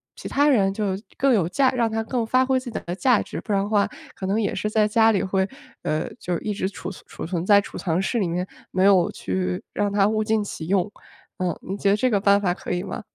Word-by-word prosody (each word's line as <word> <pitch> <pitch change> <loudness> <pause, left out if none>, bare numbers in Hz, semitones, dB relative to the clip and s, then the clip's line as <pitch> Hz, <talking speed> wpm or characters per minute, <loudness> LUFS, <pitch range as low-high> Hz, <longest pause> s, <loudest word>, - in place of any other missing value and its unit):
其 - - -7
他 285 +1 +3
人 200 -8 +3
就 205 0 -2 0.3
更 270 -1 +3
有 175 -7 +2
价 265 +6 +3
让 235 -3 +1
它 225 0 -1
更 235 +1 -1
发 255 +3 +3
挥 260 0 +2
自 255 -1 -8
己 225 - -4
的 175 - -3
价 240 +3 +3
值。 - - -6
不 - - -6
然 195 -1 +2
的 205 - -4
话 205 -2 +2 0.2
可 190 - -5
能 200 +3 +1
也 205 - 0
是 210 - -2
在 215 0 +3
家 225 +1 +4
里 200 - +1
会 190 0 0 0.3
呃， 155 +1 -1
就 175 -1 -2
一 210 - -2
直 195 -2 -2
储 200 - -7
存 195 - -12
储 - - -7
存 170 0 -2
在 200 +1 +6
储 200 - -7
藏 170 -1 0
室 230 +5 0
里 195 - +1
面， 180 +2 -2 0.2
没 185 - +1
有 190 -3 +5
去 90 -1 -3
让 205 -1 0
它 200 -1 +3
物 215 0 +1
尽 215 -1 +1
其 160 -5 -6
用。 195 +1 +1 0.5
嗯， 180 -1 -1
您 195 - -4
觉 200 0 +1
得 200 - +5
这 250 +3 +1
个 205 - +3
办 200 0 +5
法 185 -3 +1
可 - - -7
以 180 0 -1
吗？ - - -5
200 Hz, 290 characters per minute, -23 LUFS, 185-220 Hz, 0.5 s, 在